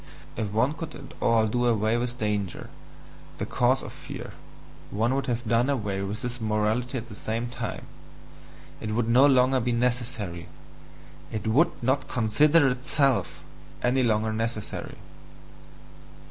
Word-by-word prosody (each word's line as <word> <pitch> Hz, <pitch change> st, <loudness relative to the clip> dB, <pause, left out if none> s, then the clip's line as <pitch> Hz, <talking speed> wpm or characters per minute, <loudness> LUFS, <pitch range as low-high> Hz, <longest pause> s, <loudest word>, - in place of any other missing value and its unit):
If 110 Hz, -, -2 dB
one 115 Hz, +7 st, +2 dB
could 160 Hz, 0 st, -7 dB
at 140 Hz, -, -11 dB
all 115 Hz, -1 st, +4 dB
do 120 Hz, +3 st, +1 dB
away 110 Hz, -1 st, +2 dB
with 120 Hz, 0 st, -2 dB
danger, 105 Hz, -4 st, -2 dB, 0.7 s
the -, -, -2 dB
cause -, -, +2 dB
of -, -, -8 dB
fear, -, -, -8 dB, 0.6 s
one 115 Hz, +5 st, +1 dB
would 135 Hz, +1 st, -1 dB
have 120 Hz, -1 st, -2 dB
done 120 Hz, +4 st, +2 dB
away 105 Hz, -8 st, -1 dB
with 105 Hz, +6 st, -4 dB
this 125 Hz, -1 st, -4 dB
morality 110 Hz, +4 st, 0 dB
at 115 Hz, -, -5 dB
the 115 Hz, -, -11 dB
same 115 Hz, +3 st, -3 dB
time, 125 Hz, -, -5 dB, 0.9 s
it 110 Hz, 0 st, -3 dB
would 115 Hz, -1 st, +1 dB
no 125 Hz, +4 st, +6 dB
longer 130 Hz, -1 st, +4 dB
be 125 Hz, 0 st, 0 dB
necessary, 115 Hz, -8 st, -1 dB, 0.8 s
it 110 Hz, -3 st, -4 dB
WOULD 125 Hz, +6 st, +2 dB
NOT 130 Hz, +2 st, +1 dB
CONSIDER 140 Hz, +7 st, +4 dB
ITSELF 125 Hz, -, +1 dB, 0.4 s
any 125 Hz, +2 st, +3 dB
longer 110 Hz, -2 st, +1 dB
necessary! 115 Hz, -1 st, -4 dB
120 Hz, 145 wpm, -26 LUFS, 110-125 Hz, 0.9 s, no